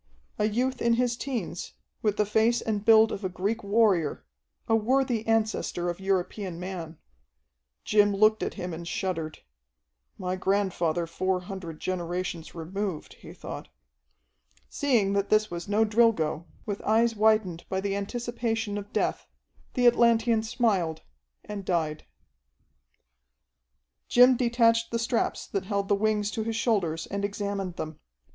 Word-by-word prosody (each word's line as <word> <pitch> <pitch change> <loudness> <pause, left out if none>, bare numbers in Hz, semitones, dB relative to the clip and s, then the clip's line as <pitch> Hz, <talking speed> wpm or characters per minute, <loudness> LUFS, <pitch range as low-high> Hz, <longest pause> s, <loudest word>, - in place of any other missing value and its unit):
A 210 - +3
youth 250 +4 0
in 235 0 +3
his 245 0 +1
teens, 235 -10 -4 0.3
with 210 -2 0
the 210 - +3
face 220 +3 +2
and 210 -2 -2
build 220 0 +6
of 200 - -5
a 185 - -1
Greek 200 +5 -2
warrior, 200 -7 +2 0.4
a 225 - +3
worthy 245 0 +1
ancestor 215 -5 0
of 175 - -9
European 190 -1 -2
man. 175 -3 -6 0.9
Jim 205 -1 +4
looked 215 +2 +3
at - - -3
him 180 -1 -5
and 170 +1 -7
shuddered. 165 -4 -3 0.7
"My 180 0 -2
grandfather 185 -4 0
four 185 +2 -1
hundred 180 -4 -7
generations 175 -2 -3
removed," 180 +1 -4
he - - -11
thought. - - -8 1.0
Seeing 230 -9 +2
that 200 0 0
this 215 -2 +3
was 170 0 -5
no 210 +2 +3
Drilgo, 210 -8 +2 0.2
with 205 -2 -4
eyes 225 +2 +2
widened 215 -5 +2
by 190 - -1
the 195 0 -1
anticipation 225 0 -2
of 205 0 -10
death, - - -1 0.5
the 250 - +2
Atlantean 235 -1 +4
smiled, 220 -9 0 0.4
and 205 -1 -6
died. 160 -4 -1 2.0
Jim 250 +1 +6
detached 230 -1 +3
the 230 - -1
straps 230 +1 -1
that 195 -2 -3
held 200 -1 -2
the - - +4
wings 210 0 0
to 220 - -3
his 225 0 -3
shoulders 180 -9 0
and 200 0 -4
examined 200 -2 -3
them. 155 -2 -6
205 Hz, 140 wpm, -27 LUFS, 180-225 Hz, 2.0 s, build